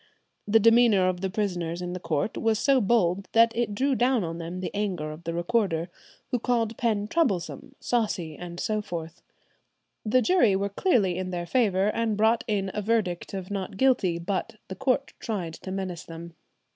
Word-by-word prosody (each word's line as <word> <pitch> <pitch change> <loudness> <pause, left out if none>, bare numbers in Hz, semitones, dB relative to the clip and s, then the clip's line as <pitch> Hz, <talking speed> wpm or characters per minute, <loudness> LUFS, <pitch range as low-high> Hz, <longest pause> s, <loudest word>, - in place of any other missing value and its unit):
The 220 +2 +5
demeanour 225 -4 +5
of 180 -1 -3
the 190 - -1
prisoners 175 -4 -2
in 180 0 -4
the 180 - -4
court 160 +3 -1
was 225 -1 +1
so 270 +2 +3
bold, 195 -3 +2
that 230 0 +5
it 230 -3 -1
drew 270 +5 +1
down 250 -3 +2
on 165 0 -4
them 170 +2 -5
the 185 - -4
anger 185 -7 -2
of 155 +2 -11
the 165 - -2
recorder, 175 -2 0 0.4
who 250 - +1
called 230 -2 0
Penn 210 -3 0
troublesome, 270 - -1
saucy, 205 -9 -1
and 175 +1 -8
so 215 -1 -1
forth. 165 -3 -7 0.8
The 245 +3 +2
jury 240 - +4
were 200 +1 -1
clearly 200 - +1
in 185 0 -3
their 175 -1 -3
favour, 200 -1 +2
and 220 -1 -1
brought 220 +2 +3
in 195 -3 -1
a 210 - -2
verdict 205 -4 -1
of 190 0 -6
not 195 0 -4
guilty, 220 -10 +2
but 185 +5 -3
the 190 - -5
court 270 +6 0
tried 185 -8 -3
to 190 - -8
menace 185 -3 -4
them. 165 0 -9
200 Hz, 185 wpm, -26 LUFS, 175-230 Hz, 0.8 s, The